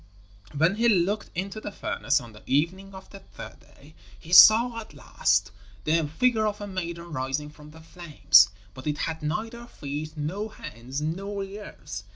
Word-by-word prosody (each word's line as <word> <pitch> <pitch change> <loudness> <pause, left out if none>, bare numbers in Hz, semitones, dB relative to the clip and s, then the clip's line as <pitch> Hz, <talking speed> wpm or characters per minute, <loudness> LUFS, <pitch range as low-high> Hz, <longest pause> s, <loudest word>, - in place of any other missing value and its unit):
When 165 +7 +2
he 235 +1 +3
looked 205 +1 +1
into 195 +4 -4
the - - -6
furnace 195 - -1
on 120 -3 -12
the 105 - -14
evening 185 +7 -1
of 190 - -12
the 195 - -10
third - - -12
day, - - -20 0.3
he 165 - -9
saw 230 +5 +8
at 215 -9 -11
last 100 -7 0 0.3
the 160 0 +1
figure 220 +7 +1
of 210 0 -3
a 205 - -5
maiden 170 -3 -6
rising 135 +2 -3
from 150 0 -15
the 160 +1 -14
flames, 155 - +4 0.2
but 130 +3 -9
it 150 0 -1
had 160 +1 -3
neither 225 +9 -4
feet 150 -2 -7
nor 195 +9 -4
hands 125 +6 -7
nor 195 +6 -3
ears. 195 - -9
170 Hz, 175 wpm, -26 LUFS, 150-205 Hz, 0.3 s, saw